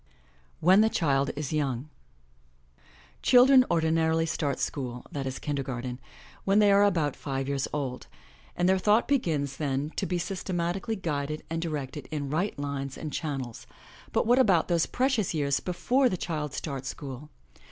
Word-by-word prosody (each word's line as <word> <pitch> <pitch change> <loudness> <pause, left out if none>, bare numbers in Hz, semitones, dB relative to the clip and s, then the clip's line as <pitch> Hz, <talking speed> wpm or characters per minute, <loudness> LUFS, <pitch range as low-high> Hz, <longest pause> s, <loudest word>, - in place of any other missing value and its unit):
WHEN 185 +5 +6
THE 220 - +4
CHILD 140 -8 +1
IS 145 0 -4
YOUNG 140 -3 -1 1.4
iHILDREN 255 +1 +7
ordinarily 160 -1 +2
start 150 -3 -1
school, 125 -3 -3
that 140 -2 -3
is 130 - -4
kinder 145 -2 -2
garten, 125 -1 -5 0.4
when 195 +1 +2
they 205 -1 +6
are 200 +1 +6
about 165 -8 +2
five 135 -1 -3
years 140 -1 -1
old, 135 -4 -4 0.5
and 175 - +1
their 190 0 +3
thought 210 +4 +3
begins 155 - 0
then 145 0 -1
to 195 - -1
be 180 - -1
systematically 180 +3 -2
guid 150 -7 -2
ed 155 0 -5
and 165 0 -1
directed 150 -3 -4
in 145 -3 -3
right 180 +5 -1
lines 140 -1 -4
and 155 -2 -6
channels, 135 -7 -4 0.4
but - - +1
what 245 +3 +4
about 190 -10 +4
those 170 -2 +2
precious 245 -9 0
years 140 -2 +1
before 250 +9 +1
the 185 - -2
child 150 -4 -3
starts 135 -4 -4
school? 140 +1 -8
155 Hz, 165 wpm, -28 LUFS, 140-185 Hz, 1.4 s, iHILDREN